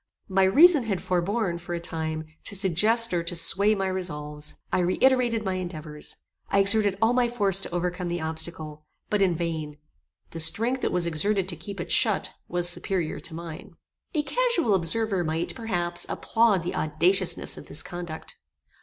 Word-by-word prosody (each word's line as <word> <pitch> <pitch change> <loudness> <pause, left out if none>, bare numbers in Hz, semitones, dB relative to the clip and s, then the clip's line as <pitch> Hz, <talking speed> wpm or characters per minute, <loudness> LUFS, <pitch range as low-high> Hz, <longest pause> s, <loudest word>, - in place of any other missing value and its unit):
My 190 0 +3
reason 295 - +6
had 195 -5 -1
forborne, 185 +1 -1
for 175 0 -5
a - - -3
time, 160 -2 -4 0.2
to 200 - -4
suggest 210 +4 +3
or 175 - +1
to 170 +1 -4
sway 200 +5 +3
my 195 -1 -2
resolves. 150 -5 -4 0.2
I 185 - +3
reiterated 230 +5 +2
my 190 - -1
endeavours. 160 -5 -6 0.3
I - - +1
exerted 200 0 +5
all 225 +2 +4
my 245 -1 +2
force 200 -5 +2
to - - -4
overcome 180 +1 -2
the 175 0 -2
obstacle, 160 -1 -5 0.2
but 210 -1 +1
in 185 -3 +3
vain. 160 -3 -4 0.5
The 165 - -7
strength 230 +11 +2
that - - 0
was 180 -1 +1
exerted 185 +4 +1
to 175 - -1
keep 190 +4 -8
it 175 - -5
shut, 215 -4 +2
was 175 0 +1
superior 175 -1 0
to 165 - -5
mine. 165 -1 -9 0.4
A 300 - +1
casual 355 - +1
observer 195 +2 +1
might, 160 +1 -2
perhaps, 175 -7 -1
applaud 225 -6 +1
the 175 - -3
audaciousness 170 +5 +1
of - - -11
this - - -3
conduct. 175 -3 -8
180 Hz, 170 wpm, -26 LUFS, 165-210 Hz, 0.5 s, reason